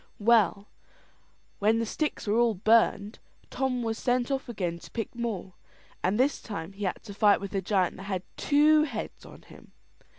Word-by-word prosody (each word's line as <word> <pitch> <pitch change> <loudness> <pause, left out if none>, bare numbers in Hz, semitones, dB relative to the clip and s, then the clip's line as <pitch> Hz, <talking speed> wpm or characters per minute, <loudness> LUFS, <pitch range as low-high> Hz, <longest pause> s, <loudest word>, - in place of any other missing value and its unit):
Well, 210 -2 +3 0.9
when 215 +2 +3
the 230 - 0
sticks 300 +7 -3
were 215 +2 +2
all 235 -2 +3
burned, 215 +1 +2 0.3
Tom 255 -2 -1
was 225 -1 -2
sent 250 +1 0
off 270 -2 -2
again 180 -7 -3
to - - -13
pick 225 -2 -5
more; 225 -6 -4 0.5
and 195 +5 +1
this 275 +3 +2
time 195 -4 -6
he 200 +1 -5
had 185 - -3
to 205 - -9
fight 205 0 +4
with 200 0 -7
a 195 - 0
giant 190 -1 0
that 190 - -9
had 185 -2 -2
two 300 +1 +4
heads 235 -7 -7
on - - -14
him. - - -17
220 Hz, 185 wpm, -28 LUFS, 200-240 Hz, 0.9 s, fight